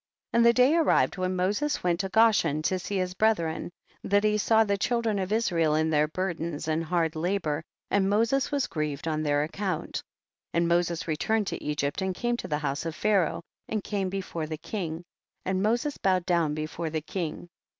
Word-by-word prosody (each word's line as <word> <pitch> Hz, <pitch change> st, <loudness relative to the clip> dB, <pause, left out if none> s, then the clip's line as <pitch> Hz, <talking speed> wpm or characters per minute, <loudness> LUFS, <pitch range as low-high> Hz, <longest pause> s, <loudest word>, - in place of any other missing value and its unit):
41. 230 Hz, -, +2 dB
And 235 Hz, -, +5 dB
the 235 Hz, -, +6 dB
day 255 Hz, +6 st, +5 dB
arrived 325 Hz, -10 st, +3 dB
when 185 Hz, 0 st, -1 dB
Moses 205 Hz, +11 st, 0 dB
went 175 Hz, -1 st, +1 dB
to 195 Hz, 0 st, -2 dB
Goshen 190 Hz, -9 st, +3 dB
to 185 Hz, +3 st, +1 dB
see 200 Hz, +2 st, -3 dB
his 185 Hz, -1 st, -1 dB
brethren, 185 Hz, -7 st, +1 dB, 0.3 s
that 205 Hz, +1 st, +2 dB
he 210 Hz, 0 st, +3 dB
saw 220 Hz, +1 st, +4 dB
the 200 Hz, -2 st, 0 dB
children 225 Hz, 0 st, 0 dB
of 190 Hz, +1 st, -3 dB
Israel 170 Hz, -9 st, +2 dB
in 160 Hz, +1 st, +1 dB
their 150 Hz, 0 st, +3 dB
burdens 165 Hz, -2 st, -3 dB
and 160 Hz, +1 st, 0 dB
hard 165 Hz, -1 st, 0 dB
la 175 Hz, +5 st, 0 dB
bor, 155 Hz, -4 st, -2 dB, 0.3 s
and 195 Hz, -1 st, +3 dB
Moses 230 Hz, +6 st, +2 dB
was 280 Hz, -2 st, +1 dB
grieved 150 Hz, -2 st, -3 dB
on 155 Hz, -1 st, 0 dB
their 145 Hz, -1 st, +2 dB
account. 190 Hz, +5 st, -3 dB, 0.6 s
42. -, -, -6 dB
And 170 Hz, 0 st, +3 dB
Moses 170 Hz, -1 st, +1 dB
returned 210 Hz, +7 st, 0 dB
to -, -, -4 dB
Egypt 145 Hz, +2 st, -1 dB
and 190 Hz, -1 st, -1 dB
came 240 Hz, +4 st, 0 dB
to -, -, -6 dB
the 150 Hz, -, 0 dB
house 145 Hz, +1 st, -2 dB
of 160 Hz, -, -4 dB
Pharaoh, 195 Hz, -5 st, +1 dB, 0.3 s
and 215 Hz, -2 st, -2 dB
came 195 Hz, -3 st, -2 dB
before 185 Hz, -4 st, -4 dB
the 155 Hz, 0 st, -4 dB
king, 170 Hz, -3 st, -4 dB, 0.4 s
and 190 Hz, 0 st, 0 dB
Moses 240 Hz, +8 st, 0 dB
bowed 185 Hz, -2 st, +2 dB
down 170 Hz, -4 st, +1 dB
before 155 Hz, +2 st, -3 dB
the 155 Hz, 0 st, -2 dB
king. 175 Hz, +1 st, -5 dB
180 Hz, 200 wpm, -27 LUFS, 160-210 Hz, 0.6 s, the